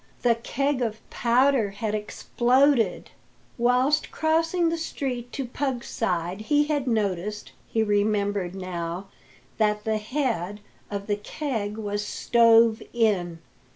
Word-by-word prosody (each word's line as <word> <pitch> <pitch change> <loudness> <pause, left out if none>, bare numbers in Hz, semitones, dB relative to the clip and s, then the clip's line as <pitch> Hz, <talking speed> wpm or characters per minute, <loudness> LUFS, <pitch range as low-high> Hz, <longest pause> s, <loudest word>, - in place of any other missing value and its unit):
The 240 -1 +5
keg 270 +4 -1
of 220 -2 -3
powder 245 -1 +3
had 210 +1 -3
exploded! 245 +4 +1 0.5
Whilst 250 +5 +2
crossing 330 +2 +1
the 335 - -1
street 250 -6 -4
to 270 - -3
Pug's 250 0 -3
side 180 -2 -2
he 295 +6 +3
had 295 -3 -1
noticed, 210 -2 -1 0.2
he 225 - +1
remembered 205 -3 0
now, 180 0 -5 0.5
that 210 -1 +2
the 220 -1 0
head, 215 - -2 0.3
of 200 -1 -4
the 205 -1 -1
keg 215 -2 -4
was 205 -1 -2
stove 230 0 +4
in. 185 -8 +1
225 Hz, 120 wpm, -25 LUFS, 205-260 Hz, 0.5 s, The